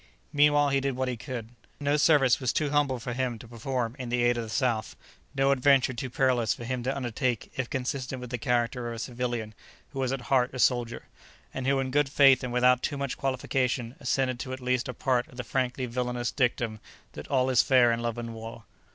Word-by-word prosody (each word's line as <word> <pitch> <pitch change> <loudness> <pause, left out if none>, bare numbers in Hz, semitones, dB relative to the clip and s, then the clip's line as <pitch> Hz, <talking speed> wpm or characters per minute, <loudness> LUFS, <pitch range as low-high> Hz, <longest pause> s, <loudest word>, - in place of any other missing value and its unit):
Meanwhile 145 0 +4
he 140 0 +2
did 135 -1 -1
what 130 0 -1
he 125 - -2
could. 115 -2 -6 0.3
No 145 0 +1
service 145 -4 +4
was 130 -3 0
too 150 -2 0
humble 145 -3 +2
for 125 0 -5
him 125 -2 -2
to 115 - -12
perform 120 +1 -3
in 125 -2 -5
the 120 0 +1
aid 120 0 +3
of 120 - -2
the 115 - -7
South, 115 -2 -1 0.4
no 135 0 +3
adventure 135 -1 +4
too 130 +2 -4
perilous 125 -3 +1
for - - -9
him 125 +1 -3
to 130 +3 -2
undertake 125 -2 -2
if 130 -2 -3
consistent 130 0 -3
with 125 -1 -8
the 125 - -3
character 120 +1 0
of 115 - -4
a - - -7
civilian 120 -2 -3 0.4
who 135 - -6
was 130 -1 0
at 135 -1 -2
heart 125 0 +1
a - - -4
soldier, 120 -2 +1 0.5
and 130 0 -3
who 135 0 +3
in 130 -1 -2
good 145 0 +2
faith 135 -2 +5
and 125 - -3
without 125 0 +4
too 145 - -2
much 140 -2 -3
qualification 130 -2 -1
assented 130 -1 0
to 130 0 -5
at 130 - -6
least 125 +1 0
a 125 - -5
part 125 -1 0
of 125 - -16
the 125 - -3
frankly 130 +1 -1
villainous 125 0 -2
dictum 120 -4 0 0.3
that - - -8
all 130 -1 +2
is 125 - +5
fair 125 -3 +4
in 115 - 0
love 120 0 -3
and 115 -1 -5
war. 115 0 -9
125 Hz, 230 wpm, -28 LUFS, 120-135 Hz, 0.5 s, faith